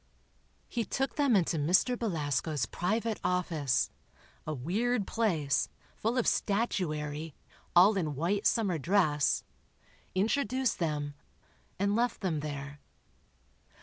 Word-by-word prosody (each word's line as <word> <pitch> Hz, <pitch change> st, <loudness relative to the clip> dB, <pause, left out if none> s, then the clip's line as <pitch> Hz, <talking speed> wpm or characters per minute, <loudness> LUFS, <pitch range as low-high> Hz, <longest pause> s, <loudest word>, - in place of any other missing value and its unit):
He 235 Hz, -, -1 dB
took 270 Hz, +5 st, -2 dB
them 280 Hz, -6 st, +3 dB
into 175 Hz, -3 st, +2 dB
Mr. 180 Hz, -, +3 dB
Belasco's 155 Hz, -, -1 dB
private 220 Hz, -, -1 dB
office—a 155 Hz, -4 st, -2 dB
weird 200 Hz, -, 0 dB
place, 165 Hz, -13 st, +1 dB, 0.3 s
full 230 Hz, +4 st, -1 dB
of 245 Hz, -, +2 dB
statuary, 160 Hz, -8 st, -1 dB, 0.4 s
all 190 Hz, +5 st, +7 dB
in 155 Hz, -6 st, -1 dB
white 185 Hz, +8 st, +1 dB
summer 200 Hz, -9 st, +1 dB
dress—introduced 200 Hz, -, 0 dB
them, 150 Hz, -3 st, -1 dB, 0.6 s
and 200 Hz, +1 st, +1 dB
left 240 Hz, 0 st, 0 dB
them 175 Hz, -6 st, 0 dB
there. 145 Hz, -1 st, -6 dB
180 Hz, 100 wpm, -31 LUFS, 150-220 Hz, 0.6 s, all